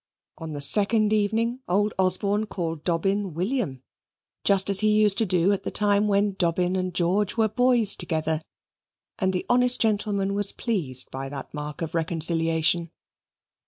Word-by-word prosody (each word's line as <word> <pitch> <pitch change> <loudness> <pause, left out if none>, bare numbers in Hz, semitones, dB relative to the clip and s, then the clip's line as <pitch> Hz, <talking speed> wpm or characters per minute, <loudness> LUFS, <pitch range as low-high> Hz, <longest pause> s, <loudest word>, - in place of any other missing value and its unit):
On 160 -2 -7
the 145 - -4
second 210 +7 +3
evening 225 +4 0
old 205 +3 +1
Osborne 200 +3 0
called 165 -6 -5
Dobbin 195 +1 -1
William, 180 - -3 0.6
just 195 -1 +4
as 200 -1 +4
he 215 - +2
used 210 -2 +2
to 225 - 0
do 180 +1 +2
at 200 - -3
the - - -5
time 205 0 +1
when 200 0 +1
Dobbin 180 0 -1
and 185 -1 -2
George 185 +5 -1
were 220 -1 +3
boys 240 -1 +3
together, 160 -1 -2 0.8
and 190 -1 0
the 185 - -3
honest 250 0 +4
gentleman 205 -2 -1
was 200 0 +4
pleased 150 - -1
by 135 +1 -6
that 140 0 -9
mark 150 +3 -6
of 160 - -6
reconciliation. 165 +1 +1
195 Hz, 160 wpm, -24 LUFS, 165-210 Hz, 0.8 s, just